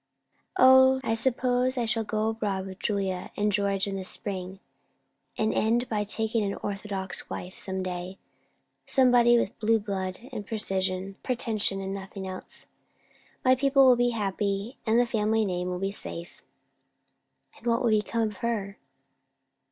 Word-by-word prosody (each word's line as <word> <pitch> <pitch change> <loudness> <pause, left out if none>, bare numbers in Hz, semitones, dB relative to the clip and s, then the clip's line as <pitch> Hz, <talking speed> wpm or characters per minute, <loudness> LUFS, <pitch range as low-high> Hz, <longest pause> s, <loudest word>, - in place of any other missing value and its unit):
"O, 260 0 +7
I 225 - 0
suppose 250 +2 +1
I 240 - +1
shall 225 0 +2
go 215 0 -1
abroad 205 -4 -2
with 190 0 -9
Julia 190 -3 -2
and 210 0 +1
George 200 -1 +1
in 200 -1 -4
the 190 - -4
spring, 190 0 -4 0.8
and 220 0 +1
end 235 +3 +1
by 210 -2 0
taking 220 +1 0
an 200 -1 -2
orthodox 195 -2 -4
wife 180 +1 -6
some 190 -1 -4
day; 180 +1 -5 0.7
somebody 245 -2 +5
with 210 - -2
blue 225 +1 +3
blood, 190 -3 -3
and 220 -5 -5
pretension, 195 +1 -1
and 195 0 -4
nothing 195 0 -7
else. 185 0 -7 0.8
My 255 - +6
people 270 +1 +4
will 255 -1 +7
be 245 0 +2
happy, 205 0 -2
and 225 +2 +4
the 245 - +4
family 220 -1 +1
name 180 -2 -2
will 180 - -2
be 195 +2 -2
safe." 170 -4 -7 1.2
"And 235 - -9
what 235 +1 +2
will 235 - +3
become 215 +2 +1
of 210 -3 -3
her?" 215 -4 -3
210 Hz, 150 wpm, -27 LUFS, 195-235 Hz, 1.2 s, O